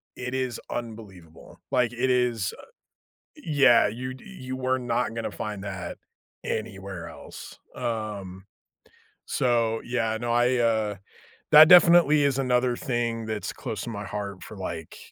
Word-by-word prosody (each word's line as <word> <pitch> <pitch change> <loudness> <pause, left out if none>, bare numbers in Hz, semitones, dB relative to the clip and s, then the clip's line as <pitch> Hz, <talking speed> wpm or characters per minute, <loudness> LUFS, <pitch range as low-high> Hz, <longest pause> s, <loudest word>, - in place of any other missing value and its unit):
it 125 0 -5
is 130 -3 -2
unbelievable. 105 -9 -9
Like, 125 -2 +2
it 125 +2 0
is, 120 -5 +1
uh - - -12 0.7
yeah, 140 - +4
you 130 +4 -5
you 130 -10 -8
were 130 0 0
not 120 -1 -1
gonna 115 - -3
find 105 -2 -5
that 95 -3 -6 0.5
anywhere 95 -5 -5
else. - - -11 0.2
Um. 100 -5 -4 0.8
So 115 -3 +1
yeah. 115 -2 -1
No, 120 0 -1
I, 120 +1 +3
uh, 110 -3 +1 0.6
that 155 +1 +10
definitely 170 -4 +7
is 140 -1 +1
another 125 -1 +1
thing 120 -2 -2
that's 110 -1 -4
close 110 -6 -5
to - - -5
my 105 -2 -5
heart 100 -2 -6
for, 110 - -10
like, 85 -4 -6
115 Hz, 140 wpm, -26 LUFS, 105-130 Hz, 0.8 s, that